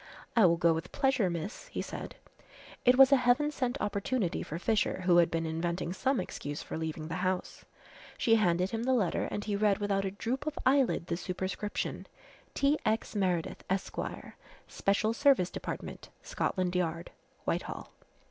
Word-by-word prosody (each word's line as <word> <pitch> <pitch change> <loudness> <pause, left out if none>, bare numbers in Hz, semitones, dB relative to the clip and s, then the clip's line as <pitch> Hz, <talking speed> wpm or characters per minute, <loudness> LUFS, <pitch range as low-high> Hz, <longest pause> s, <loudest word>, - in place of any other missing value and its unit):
"I 225 -6 +7
will 170 0 +3
go 170 -1 +4
with 165 +2 -5
pleasure, 265 -8 +2
miss," 175 - -5
he - - -4
said. - - -7 0.7
It 250 +1 +6
was 270 0 +8
a 275 - +7
heaven 250 +4 +3
sent 260 -1 -2
opportunity 205 -1 -1
for 155 - -5
Fisher, 210 0 0
who 180 -1 +4
had 170 -1 +5
been 165 0 -1
inventing 170 +2 -2
some 260 +6 0
excuse 145 +1 -5
for - - -6
leaving 160 -1 -4
the 165 - -3
house. 185 -1 -2 0.5
She 230 - +3
handed 185 -4 +3
him 225 - -2
the 260 +2 +2
letter 200 -8 +1
and 205 - -3
he 205 - -1
read 205 -1 +3
without 200 -1 0
a 195 - -1
droop 245 +9 -3
of 305 - -3
eyelid 265 -9 +3
the 170 -1 -2
superscription: 190 +3 -4 0.5
"T. 285 +2 +2
X. 220 0 -1
Meredith, 180 -5 -1
Esq., 190 +1 -2 0.7
Special 210 +3 +1
Service 260 -8 +3
Dept., - - -6
Scotland 185 -2 -1
Yard, 170 -1 -1 0.3
Whitehall." - - -3
195 Hz, 165 wpm, -31 LUFS, 175-245 Hz, 0.7 s, was